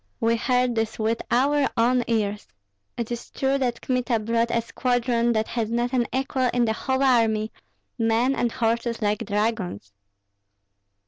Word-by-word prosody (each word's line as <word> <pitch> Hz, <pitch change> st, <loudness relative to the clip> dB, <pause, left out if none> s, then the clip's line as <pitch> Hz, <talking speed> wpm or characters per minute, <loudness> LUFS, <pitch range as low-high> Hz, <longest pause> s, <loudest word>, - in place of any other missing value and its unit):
We 230 Hz, +1 st, +2 dB
heard 250 Hz, +1 st, +1 dB
this 225 Hz, -1 st, -2 dB
with 225 Hz, +1 st, 0 dB
our 280 Hz, +3 st, +2 dB
own 245 Hz, +2 st, +3 dB
ears. 210 Hz, -3 st, -1 dB, 0.5 s
It 235 Hz, 0 st, -3 dB
is 240 Hz, -, -5 dB
true 270 Hz, +1 st, 0 dB
that 245 Hz, -3 st, -1 dB
Kmita 250 Hz, -2 st, 0 dB
brought 230 Hz, +2 st, 0 dB
a 235 Hz, -, +1 dB
squadron 240 Hz, 0 st, 0 dB
that 220 Hz, 0 st, 0 dB
has 230 Hz, -2 st, -2 dB
not 240 Hz, +2 st, -1 dB
an 245 Hz, -2 st, +2 dB
equal 260 Hz, 0 st, 0 dB
in 245 Hz, -1 st, +3 dB
the 220 Hz, -, +1 dB
whole 265 Hz, +4 st, -1 dB
army, 225 Hz, -4 st, +2 dB, 0.5 s
men 230 Hz, +3 st, +2 dB
and 240 Hz, -1 st, 0 dB
horses 230 Hz, 0 st, -1 dB
like 210 Hz, +2 st, 0 dB
dragons!" 205 Hz, -, -2 dB
235 Hz, 155 wpm, -24 LUFS, 225-250 Hz, 0.5 s, own